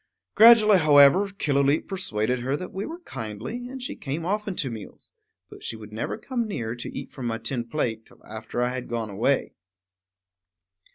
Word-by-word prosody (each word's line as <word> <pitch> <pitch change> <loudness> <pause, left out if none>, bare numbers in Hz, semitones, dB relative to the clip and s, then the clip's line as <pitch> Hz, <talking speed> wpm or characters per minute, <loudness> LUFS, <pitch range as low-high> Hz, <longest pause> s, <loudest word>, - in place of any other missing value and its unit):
Gradually, 215 -3 +8
however, 150 +5 +6
Killooleet 145 -6 +1
persuaded 125 - -1
her 130 +4 -1
that 180 - -8
we 195 +2 -4
were 335 +2 -8
kindly, 125 - -6
and 265 -1 -7
she - - -5
came 150 +4 -4
often 205 +1 -2
to 135 -7 -2
meals; 110 -3 -10 0.4
but - - -14
she - - -4
would 105 -1 -11
never 110 - -3
come 235 0 -3
near, 120 - -3
to 120 - -7
eat - - -7
from 130 -3 -5
my 115 -1 -1
tin 120 +1 -3
plate, 115 -4 -3
till - - -20
after 110 +2 -4
I 125 - +1
had 130 -1 -5
gone 115 -3 -3
away. 115 +7 0
140 Hz, 180 wpm, -25 LUFS, -, 0.4 s, Gradually